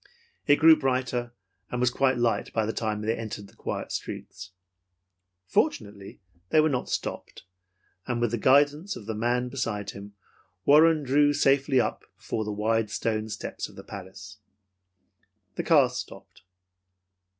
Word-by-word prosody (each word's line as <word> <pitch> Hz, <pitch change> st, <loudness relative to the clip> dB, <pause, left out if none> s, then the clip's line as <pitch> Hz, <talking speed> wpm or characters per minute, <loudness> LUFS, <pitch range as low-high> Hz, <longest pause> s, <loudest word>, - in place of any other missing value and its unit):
It 145 Hz, -, +7 dB
grew 160 Hz, +2 st, +7 dB
brighter, 125 Hz, -4 st, -1 dB, 0.4 s
and 125 Hz, -, -3 dB
was 125 Hz, -1 st, +2 dB
quite 130 Hz, 0 st, +1 dB
light 120 Hz, -1 st, 0 dB
when 110 Hz, -1 st, -1 dB
they 110 Hz, +1 st, +1 dB
entered 110 Hz, -3 st, -6 dB
the -, -, -21 dB
quiet -, -, -5 dB
streets. 90 Hz, 0 st, -6 dB, 1.0 s
Fortunately 100 Hz, +1 st, -2 dB, 0.3 s
they 155 Hz, -, +4 dB
were 155 Hz, +1 st, +4 dB
not 125 Hz, -2 st, -2 dB
stopped, -, -, -5 dB, 0.6 s
and 120 Hz, -1 st, -1 dB
with 120 Hz, -2 st, 0 dB
the 120 Hz, -, -1 dB
guidance 145 Hz, -, +3 dB
of 105 Hz, -, -10 dB
the 110 Hz, -, -3 dB
man 120 Hz, +3 st, 0 dB
beside 105 Hz, -6 st, -3 dB
him 100 Hz, +1 st, -11 dB, 0.5 s
Warren 155 Hz, +1 st, +5 dB
drew 145 Hz, +2 st, +3 dB
safely 140 Hz, -1 st, +3 dB
up 110 Hz, -3 st, -1 dB
before 110 Hz, -, -3 dB
the 105 Hz, -, -4 dB
wide 110 Hz, +1 st, 0 dB
stone 110 Hz, 0 st, -2 dB
steps 105 Hz, -, -5 dB
of -, -, -17 dB
the -, -, -10 dB
palace. 105 Hz, +2 st, -10 dB, 1.1 s
The -, -, -3 dB
car -, -, +5 dB
stopped. -, -, -9 dB
120 Hz, 145 wpm, -27 LUFS, 105-135 Hz, 1.1 s, It